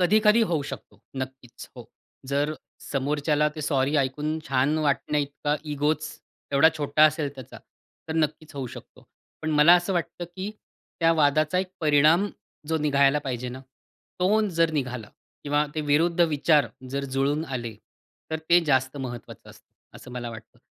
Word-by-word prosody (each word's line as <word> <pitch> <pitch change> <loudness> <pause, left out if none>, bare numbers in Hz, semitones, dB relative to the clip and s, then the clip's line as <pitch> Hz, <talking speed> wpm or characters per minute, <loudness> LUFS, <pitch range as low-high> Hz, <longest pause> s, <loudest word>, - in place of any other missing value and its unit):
कधी-कधी 210 +4 +4
होऊ 155 -4 +1
शकतो - - -10 0.2
नक्कीच. 130 -2 -10
हो. - - -8 0.5
जर 145 +2 0 0.3
समोरच्याला, 145 +2 0
ते 155 +1 -9
सॉरी 140 -1 +1
ऐकून 150 +3 -1
छान 135 +3 +2
वाटण्याइतका 145 0 0 0.2
इगोच 150 +2 0 0.4
एवढा 140 +3 +6
छोटा 150 0 +3
असेल 155 -1 +2
त्याचा 130 -3 -11 0.5
तर 160 - -3
नक्कीच 155 -1 -1
होऊ 135 -2 -4
शकतो. - - -12 0.4
पण 155 - -1
मला 150 +3 +7
असं 175 +2 -2
वाटतं 175 0 -3
की 190 +3 -4 0.5
त्या 165 0 +5
वादाचा 155 +2 +2
एक 185 0 -2
परिणाम, 155 +5 +4 0.4
जो 160 - +1
निघायला 140 -1 +3
पाहिजे 125 -3 -4
ना, 130 +2 -7 0.6
तो 200 +4 +3
जर 165 -2 +2
निघाला 125 -7 -3 0.4
किंवा 145 +1 +1
ते 155 - -1
विरुद्ध 160 +4 +2
विचार 150 -2 +3 0.2
जर 140 +1 -2
जुळून 145 +3 +1
आले 120 -7 -5 0.6
तर 160 - -1
ते 175 +1 +7
जास्त 130 -2 +1
महत्त्वाचं 125 -4 -8
असतं, - - -20 0.2
असं - - -12
मला 120 -1 -5
वाटतं. 110 - -12
150 Hz, 150 wpm, -25 LUFS, 135-160 Hz, 0.6 s, मला